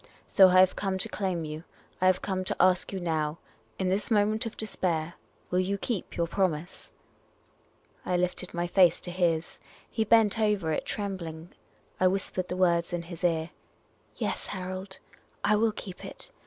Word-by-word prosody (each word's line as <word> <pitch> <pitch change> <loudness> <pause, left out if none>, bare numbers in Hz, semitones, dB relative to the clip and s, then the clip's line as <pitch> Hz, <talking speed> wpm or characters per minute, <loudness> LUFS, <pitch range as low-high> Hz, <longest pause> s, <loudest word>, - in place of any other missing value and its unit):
So 190 -2 +7
I 185 0 +7
have 185 - +4
come 195 -2 -1
to 195 - -1
claim 185 -6 -2
you. 155 +1 -6 0.4
I 185 - +5
have 185 0 +3
come 190 -2 -1
to - - -1
ask 185 0 +3
you 195 - -3
now, 160 -3 -1 0.4
in 185 - 0
this 195 +3 0
moment 215 0 +2
of 225 - -8
despair, 175 -6 -1 0.4
will 180 - +2
you 195 +2 0
keep 205 -1 -4
your 170 - +2
promise? 175 -1 -2 0.4
' - - -37
' - - -38 0.3
I 180 - 0
lifted 180 0 -2
my 175 0 -2
face 175 -1 +4
to 175 - -6
his. 170 -3 0 0.3
He 220 - -1
bent 220 0 +4
over 210 -7 +1
it 155 - -1
trembling. 175 -5 -4 0.5
I 185 - +5
whispered 185 -1 -1
the 180 - -4
words 170 -2 +2
in 175 -1 -2
his 170 0 -10
ear. 165 -1 +1 0.4
" - - -38
Yes, - - -3
Harold, 185 0 -6 0.5
I 210 +1 +4
will 220 +1 +3
keep 190 -3 -9
it. - - -10
185 Hz, 185 wpm, -28 LUFS, 170-195 Hz, 0.5 s, So